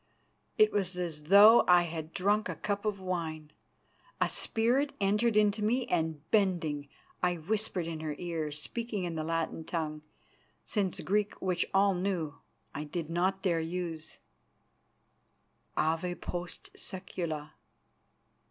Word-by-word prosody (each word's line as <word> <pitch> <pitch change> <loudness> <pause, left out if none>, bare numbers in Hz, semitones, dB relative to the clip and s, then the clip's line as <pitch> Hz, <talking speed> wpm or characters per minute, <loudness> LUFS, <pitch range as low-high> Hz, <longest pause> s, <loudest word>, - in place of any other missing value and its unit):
it 430 0 +6
was 185 -3 -1
as 160 -4 -4
though 205 +6 +9
I 180 -1 +7
had 160 -1 -5
drunk 205 +4 +1
a - - -3
cup 205 0 -3
of 210 -2 -1
wine. 160 -5 -4 0.7
A - - +2
spirit 250 +6 +1
entered 210 +3 +2
into 210 0 +3
me 240 +4 +2
and, 160 -3 -1
bending, 170 -8 +1 0.3
I 180 -1 +2
whispered 185 +1 -2
in 165 -1 -4
her 155 -1 -3
ear, 165 -4 -3
speaking 210 +7 -3
in 175 -1 -2
the 160 -1 -2
Latin 165 0 -2
tongue, 155 -2 -3 0.6
since 195 -4 -1
Greek, 205 +2 0
which 180 -2 0
all 195 0 +4
knew, 175 -5 -2 0.3
I 150 - -4
did 160 +1 -4
not 185 +3 0
dare 175 -4 +2
to - - -3
use, 165 -3 -4 1.6
"_Ave 165 +3 0
post 175 0 -6
secula! 165 -5 -5
180 Hz, 135 wpm, -31 LUFS, 160-200 Hz, 1.6 s, though